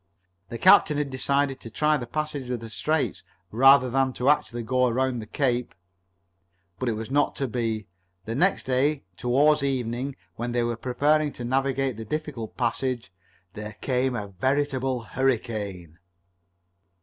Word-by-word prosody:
The 115 - -5
captain 170 - +6
had 145 -2 -1
decided 135 +1 0
to 115 - -9
try 150 +7 +2
the 125 -5 -4
passage 150 -2 -3
of 125 -1 -2
the 115 0 -9
Straits 155 +7 -1 0.3
rather 135 +3 +6
than 130 +1 +1
to 130 +4 +3
actually 120 -5 -1
go 125 +2 +2
around 125 +1 0
Cape 125 -4 0
Horn. - - -39 1.0
But 125 - 0
it - - 0
was 110 +3 -6
not 145 +1 +2
to 135 - -1
be. 115 -3 -2 0.4
The 115 - -3
next 180 +10 +2
day, 135 +3 +1
toward 140 +7 +3
evening, 130 0 -2 0.2
when 120 +1 -3
they 120 -1 +1
were 120 0 -1
preparing 145 +6 +1
to 120 - -6
navigate 135 -1 0
the 110 - -6
difficult 135 -4 -5
passage, 125 -2 -2 0.4
there 105 0 -7
came 125 +3 -1
a 105 -4 -4
veritable 130 +4 0
hurricane. 105 -10 -2
130 Hz, 155 wpm, -26 LUFS, 115-140 Hz, 1.0 s, captain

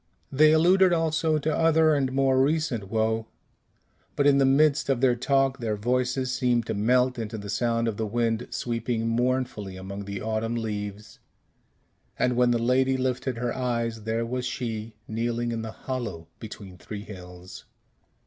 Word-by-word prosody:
They 155 +3 +5
alluded 180 +3 +5
also 160 -1 +1
to 155 +1 -1
other 160 -1 +4
and 135 -3 +1
more 135 -1 +3
recent 140 -8 0
woe, 110 0 0 0.9
but 145 - +1
in 140 -1 +5
the 135 - +4
midst 145 +1 +3
of 135 -3 +2
their 125 -1 +3
talk 135 +2 +1
their 110 -3 -1
voices 125 +3 0
seemed 120 -3 +1
to 110 - -2
melt 125 +4 +2
into 110 0 -4
the 100 -1 -6
sound 115 +1 0
of 110 -3 -2
the 110 - -1
wind 115 +1 -1
sweeping 115 -1 -2
mournfully 120 -5 -1
among 100 +2 -7
the 100 0 -5
autumn 110 +2 -2
leaves; 105 -2 -5 1.0
and 125 -1 +1
when 125 0 +3
the 120 - +3
lady 130 +3 +2
lifted 130 -1 -2
her 120 0 -2
eyes, 115 -3 -2
there 110 +2 -1
was 125 +1 -3
she 115 -3 -4
kneeling 120 +1 -2
in 115 -1 -3
the 110 - -5
hollow 110 -11 -5
between 100 -4 -10
three 105 +1 -7
hills. 90 -2 -11
120 Hz, 165 wpm, -26 LUFS, 110-130 Hz, 1.0 s, They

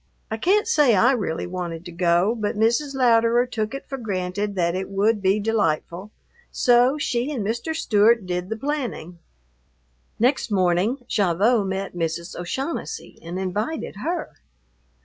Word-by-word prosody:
I 220 - -1
can't 410 - +2
say 295 - +4
I 235 +7 +5
really 200 -11 -2
wanted 175 -2 -5
to 175 - -8
go, 175 +4 +2
but 215 -1 -3
Mrs. 235 +6 +1
Louderer 235 -1 +4
took 225 0 -3
it 275 - -7
for 270 -1 -5
granted 200 -1 -3
that 170 -2 +1
it 190 +1 -3
would 205 +2 +1
be 195 +2 +2
delightful, 200 -3 -1 0.4
so 245 +3 +4
she 255 -1 -1
and 235 -9 -3
Mr. 235 +9 -2
Stewart 220 - +3
did 180 0 -3
the 220 - -3
planning. 225 - -4 1.0
Next 250 +2 +1
morning 195 +6 +1
Gavotte 205 +3 +2
met 195 +1 -3
Mrs. 170 +1 -3
O'Shaughnessy 265 - -5
and 170 +2 -6
invited 205 - -3
her. 335 - -4
210 Hz, 150 wpm, -23 LUFS, 185-245 Hz, 1.0 s, I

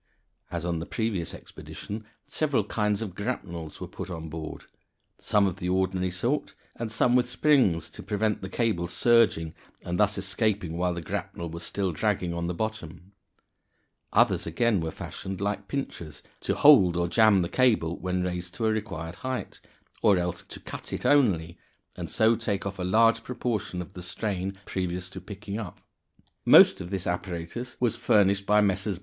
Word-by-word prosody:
As 85 -1 -4
on 85 -2 -1
the 85 - -6
previous 100 -3 -2
expedition, 105 +1 -8 0.2
several 145 -8 0
kinds 105 0 0
of 100 -5 -6
grapnels 85 -7 -5
were - - -5
put - - -7
on 80 -2 -6
board, 80 0 -7 0.5
some 105 -2 +2
of 95 -3 -1
the 90 - -3
ordinary 95 0 +1
sort, 120 +11 -1 0.2
and 115 -2 -4
some 120 +2 +3
with 125 -1 +3
springs 125 - +3
to - - -9
prevent 105 0 -1
the 95 - -5
cable 95 -6 0
surging, 105 -6 +3 0.3
and 90 +2 -3
thus 105 0 +3
escaping 100 -3 0
while 90 0 0
the 85 - -5
grapnel 85 +1 -4
was 85 +1 -6
still 95 +1 -1
dragging 90 0 0
on 85 0 -2
the 90 - -2
bottom; 95 -4 -5 1.0
others, - - +3
again, 115 -6 +1
were 80 - -2
fashioned 95 +4 -6
like 100 0 -2
pincers, 85 - -5 0.2
to - - -1
hold 95 - +7
(or 85 0 +1
jam) 105 -1 +5
the - - -1
cable 110 -8 +2
when 90 0 -1
raised 90 0 -4
to 115 - -1
a 110 - +3
required 90 -6 -4
height, 130 -1 -5 0.4
or 100 -3 +5
else 90 0 -2
to - - -11
cut - - -8
it - - -4
only, 90 - +3 0.4
and - - -6
so 110 +1 +3
take 105 -4 -2
off 100 -1 -5
a - - -2
large 115 +4 +4
proportion 110 -7 -3
of 90 - -16
the 90 - -8
strain 95 +1 -3
previous 90 -1 -3
to - - -8
picking 100 +1 -6
up. 105 -5 -7 0.6
Most - - +7
of 85 - -6
this 95 -2 -3
apparatus 90 +7 -4
was 120 -2 +1
furnished 100 -1 +3
by 105 0 +5
Messrs. 100 -1 0
95 Hz, 175 wpm, -27 LUFS, 90-110 Hz, 1.0 s, hold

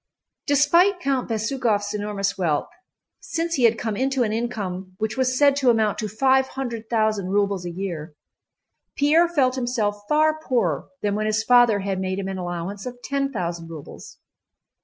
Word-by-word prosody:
Despite 340 +7 +4
Count 275 -7 -1
Bezúkhov's 220 -2 0
enormous 205 -1 -2
wealth, 160 -6 0 0.5
since 335 0 -3
he 255 -6 +3
had 230 0 +4
come 220 -1 -3
into 265 +2 +1
an 215 -2 -1
income 195 -6 -4
which 215 +1 -2
was 255 -1 +1
said 285 0 +5
to 265 -3 +3
amount 220 -3 +2
to 215 - -2
five 265 +5 +2
hundred 235 -5 -5
thousand 215 -4 +1
rubles 200 -2 0
a - - -3
year, 170 -4 -5 0.8
Pierre 310 +4 +4
felt 270 -7 +2
himself 235 -5 -1
far 310 +1 +3
poorer 190 - 0 0.2
than 205 -1 +1
when 215 +1 -1
his 215 0 +1
father 240 -3 +5
had 195 -1 -2
made 190 0 -2
him 195 -1 -3
an 190 -1 -4
allowance 180 +4 -5
of 250 0 -7
ten 275 0 -1
thousand 170 -6 -4
rubles. 160 -3 -10
220 Hz, 170 wpm, -23 LUFS, 195-265 Hz, 0.8 s, said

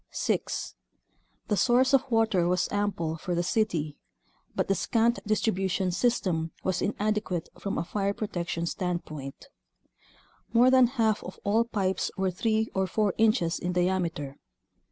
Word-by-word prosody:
6. - - -2 0.7
The 210 - +1
source 255 +6 +3
of 270 0 +3
water 220 -7 +2
was 180 0 +1
ample 200 -6 -1
for 175 +2 -3
the 175 - +1
city, 170 -7 -1 0.6
but - - 0
the 195 - +3
scant 230 +4 +1
distribution 190 -3 0
system 175 -6 0
was 185 -1 0
in 205 - -1
adequate 210 -5 -1
from 200 - -3
a - - 0
fire 200 +3 -1
protection 175 -5 -3
standpoint. 170 - -4 1.0
More 245 +2 +6
than 255 -1 +6
half 220 -2 +2
of - - -8
all 220 +3 +2
pipes 190 -5 -1
were 190 -1 +1
three 220 +4 0
or 190 0 0
four 205 +1 +1
inches 215 -7 +2
in 180 +1 -2
diameter. 175 -6 -1
190 Hz, 145 wpm, -28 LUFS, 175-220 Hz, 1.0 s, More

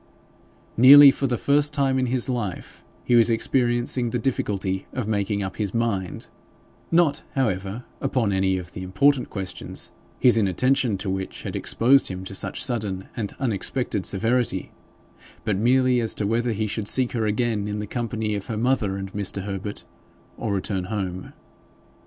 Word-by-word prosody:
Nearly 140 +4 +10
for 135 - -2
the 120 -1 -1
first 145 +3 +3
time 135 -2 +1
in 130 - 0
his 125 0 +1
life 120 -8 -5 0.2
he - - 0
was 120 -1 +5
experiencing 120 +1 +1
the 125 - -2
difficulty 100 -6 -2
of 130 -5 -3
making 100 -1 -1
up 95 - -6
his 105 0 -2
mind, 100 -6 -2 0.6
not, 165 -3 +2
however, 105 -3 -2 0.2
upon 115 -6 0
any 95 0 +1
of 90 -1 -8
the - - -8
important 125 +9 +1
questions, 95 -3 -4 0.3
his 120 -3 +5
inattention 110 +3 +1
to 95 +1 -4
which 95 0 -5
had - - -5
exposed 135 +4 +3
him 95 0 -5
to 95 - -8
such - - 0
sudden 105 -7 -2
and 105 -4 -4
unexpected 115 -3 -1
severity, 115 -2 -1 0.7
but 105 - 0
merely 125 +3 +2
as 115 - +1
to 105 - -2
whether 115 +3 0
he 110 0 -2
should 105 0 -3
seek 130 +1 +3
her 115 -3 -1
again 105 -1 -1
in 105 0 -3
the 105 - -4
company 110 -1 -3
of 100 -1 -5
her 110 - -4
mother 110 -5 0
and 95 0 -7
Mr. 100 -1 -1
Herbert, 100 +1 -5 0.5
or 110 - -4
return 95 -1 -2
home. 95 -3 -5
110 Hz, 165 wpm, -23 LUFS, 100-125 Hz, 0.7 s, Nearly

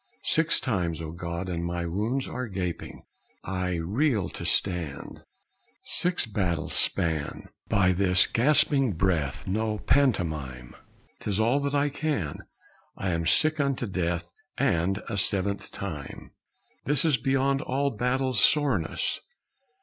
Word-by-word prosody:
Six 160 +1 +3
times, 90 - -1
O 80 -1 -5
God, 85 +2 -5
and 85 -2 -3
my 85 0 -2
wounds 110 +10 -1
are 125 0 -4
gaping! 90 -4 -5 0.4
I 90 -1 -2
reel 105 - 0
to - - -6
stand. 90 -7 -1 0.6
"Six 180 -4 +1
battles' 90 -8 -1
span! 80 -3 -1 0.2
By 95 -2 +3
this 90 0 +3
gasping 135 -1 +3
breath 85 -6 0
No 110 +2 -1
pantomime. 80 - 0 0.4
Tis 105 -1 -1
all 120 +6 +3
that 140 0 -1
I 145 +1 +2
can. 140 - -2 0.6
I 95 - -1
am 85 -1 -1
sick 155 - +3
unto 140 -3 0
death. 85 -4 -2 0.3
And 90 +4 +1
a 105 - -3
seventh 100 +1 +1
time? 80 -8 -7 0.5
"This 145 +1 +3
is 150 -5 +4
beyond 135 +2 +1
all 140 -2 -1
battles' 130 +2 +1
soreness!" 140 - +2
100 Hz, 125 wpm, -27 LUFS, 85-135 Hz, 0.6 s, is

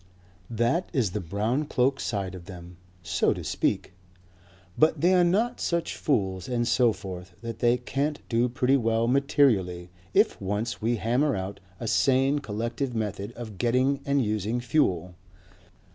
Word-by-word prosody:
That 120 - 0
is 120 - +1
the 105 - -2
brown 105 - -1
cloak 135 -1 +1
side 100 -4 -3
of 90 -2 -9
them, 90 -2 -11 0.3
so - - +1
to - - -7
speak. - - -1 0.8
But 155 +1 +3
they 180 +3 +4
are 180 -1 +5
not 215 +8 +1
such 170 -1 -1
fools 95 - -1
and 120 -1 0
so 120 -1 +4
forth 90 -3 -8
that 115 -1 -6
they 120 0 +3
can't 140 +4 -2
do 120 +1 +1
pretty 125 +2 +2
well 115 -1 +1
materially 115 - +2 0.2
if - - +3
once 105 +5 -2
we 115 +2 +1
hammer 125 +6 +1
out 95 +1 -5 0.2
a 115 - -4
sane 135 +4 +3
collective 115 +2 -3
method 105 -1 -3
of 110 -6 -9
getting 130 +4 +2
and 140 -3 +1
using 110 +3 -1
fuel. 95 - 0
120 Hz, 155 wpm, -27 LUFS, 100-135 Hz, 0.8 s, are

